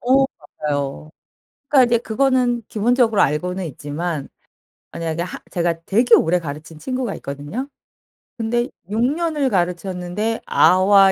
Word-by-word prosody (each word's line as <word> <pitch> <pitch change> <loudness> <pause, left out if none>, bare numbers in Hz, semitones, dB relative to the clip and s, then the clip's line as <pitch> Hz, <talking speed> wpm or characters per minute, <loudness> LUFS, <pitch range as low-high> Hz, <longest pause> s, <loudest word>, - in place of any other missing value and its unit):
어 265 +2 +4 0.4
맞아요. 145 +1 -2 0.6
그러니까 270 -3 +6
이제 235 -1 +3
그거는 245 0 +1
기본적으로 225 0 +2
알고는 180 +6 0
있지만 150 +1 -4 0.6
만약에 165 -1 -3
하 175 +1 -5
제가 170 -1 -1
되게 230 +5 +5
오래 175 +2 +3
가르친 155 0 -8
친구가 255 0 -3
있거든요. 145 - -5 0.7
근데 240 +2 0 0.2
6 215 +2 -1
년을 300 0 +1
가르쳤는데 180 +3 -1
아와 195 +1 +5
195 Hz, 295 characters per minute, -21 LUFS, 165-240 Hz, 0.7 s, 그러니까